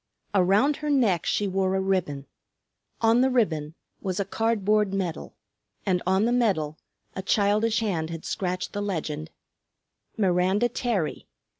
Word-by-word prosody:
Around 200 +10 +3
her 300 -1 -4
neck 230 - +2
she 205 - +1
wore 190 0 0
a - - +1
ribbon; 185 -8 -1 0.8
on 230 +1 +4
the 265 - +4
ribbon 160 - 0 0.3
was 185 -1 -2
a 200 - 0
cardboard 210 -1 +1
medal; 180 -4 -4 0.5
and 185 -3 +1
on 190 +3 +3
the 235 - +1
medal 190 -11 +1 0.4
a 190 - -3
childish 210 +3 +2
hand 170 -7 -1
had 165 -1 -7
scratched 180 -1 -3
the 205 - -2
legend, 155 -6 -3 0.9
_Miranda 190 +3 +2
Terry. 220 -12 -2
195 Hz, 140 wpm, -26 LUFS, 180-220 Hz, 0.9 s, on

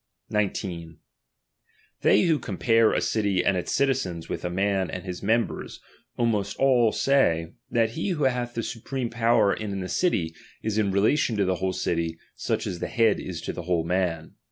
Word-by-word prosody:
19, 90 -6 -2 1.0
They 105 - +5
who 160 -4 +2
compare 115 +3 +2
a - - +1
city 100 -4 0
and 100 - +3
its 90 - -2
citizens 130 -12 0
"iiaf - - -3
■with - - -18
a - - -1
man 95 +1 0
and 90 - -5
his 90 -2 -6
members, 115 +3 -1 0.4
almost 105 -4 0
all 125 -4 +4
say, 85 -14 +2 0.2
that 115 -2 +2
.wihT 160 - -3
lie 190 - +1
who 150 - -1
hath 125 -2 0
the 115 - -2
supreme 125 +2 -4
power 115 -3 +3
in 100 -3 -4
the 90 - -4
city 90 - 0 0.3
is 110 -1 0
in 105 - +2
prJ^j," - - -2
relation 110 +3 +2
to 100 - +2
the 95 0 +1
whole 95 0 -1
city, 85 -2 -1 0.2
such - - -2
as 90 - -4
the - - -2
head 115 -1 +2
is 85 -3 -6
to - - -4
'' - - -10
l""^ - - -12
the - - -4
"whole 85 -1 0
man. 85 -2 -1
100 Hz, 200 wpm, -26 LUFS, 90-120 Hz, 1.0 s, They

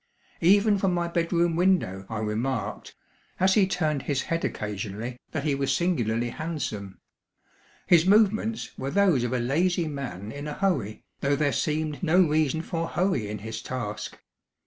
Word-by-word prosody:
Even 200 +3 +5
from 190 -2 +1
my 170 -1 0
bed 170 -1 -1
room 170 -1 +2
window 170 - +1
I 110 - -3
remarked, 110 0 -3 0.4
as 190 +1 +4
he 200 -2 +4
turned 155 -6 0
his 135 -1 -1
head 165 0 -2
occasionally, 105 +4 -4
that 155 - -3
he 150 -2 +1
was 135 0 0
singularly 120 -7 0
handsome. 125 - -5 0.9
His 170 0 +5
movements 220 +2 +2
were 135 - -2
those 180 -7 +3
of 120 - -1
a 130 - +1
lazy 165 +8 +1
man 120 -9 -5
in 145 +3 -6
a 150 - -4
hurry, 180 - -1 0.2
though 140 +1 +1
there 145 -1 +1
seemed 155 -1 -1
no 175 +1 +3
reason 155 -2 +2
for 165 -1 -3
hurry 175 - 0
in 105 - -4
his 110 0 -5
task. 110 -5 -5
150 Hz, 165 wpm, -26 LUFS, 120-175 Hz, 0.9 s, Even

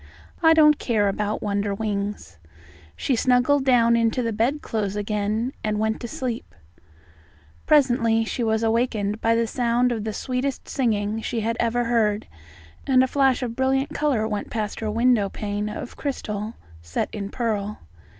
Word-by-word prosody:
"I 325 -1 +6
don't 300 -2 +6
care 215 -4 +1
about 210 +1 -2
Wonderwings." 200 - -2 0.6
She 265 - 0
snuggled 255 +4 +3
down 235 -3 +4
into 230 +2 +1
the 230 -1 -1
bedclothes 225 -4 -1
again, 210 +4 -1
and 215 -1 0
went 220 +1 -1
to 235 - -4
sleep. 240 0 -5 1.1
Presently 240 -6 +3
she 240 - -3
was 220 0 +1
awakened 220 -2 0
by 230 0 +3
the 230 0 +2
sound 240 +1 +1
of 225 -3 -2
the 220 - -2
sweetest 255 +5 -3
singing 220 -4 0
she 230 0 -2
had 230 +2 -1
ever 240 +1 +1
heard, 220 -3 +1 0.6
and 260 -2 +5
a - - +1
flash 270 -1 +2
of 235 -2 -4
brilliant 265 +2 +1
colour 260 -8 +1
went 210 -2 -4
past 215 -2 -3
her 220 - -2
window 230 -2 +2
pane 205 +1 -3
of 210 - -7
crystal 220 -6 -4 0.3
set 85 0 -3
in 200 -2 -4
pearl. 210 -3 -2
225 Hz, 155 wpm, -24 LUFS, 210-250 Hz, 1.1 s, I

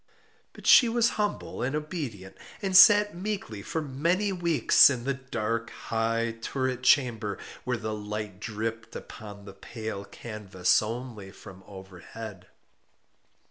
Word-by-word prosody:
But - - -14
she 240 - +7
was 235 0 +2
humble 210 -1 -3
and 135 +4 -1
obedient, 145 - -5 0.3
and 190 -1 -1
sat 205 +1 +8
meekly 185 - -5
for 160 +9 -3
many 170 +9 0
weeks 170 -7 +5
in 125 -4 -3
the 140 +2 -1
dark, 115 -3 -3
high 115 0 -2
turret 130 0 -2
chamber 115 -6 +2 0.3
where 125 -1 -1
the 110 -1 -4
light 105 -2 -6
dripped 110 +1 -5
upon 105 -2 -10
the 100 - -10
pale 110 -1 -7
canvas 100 -4 -1
only 110 -2 -6
from 95 -1 -13
overhead. 95 +1 -10
115 Hz, 130 wpm, -27 LUFS, 105-145 Hz, 0.3 s, sat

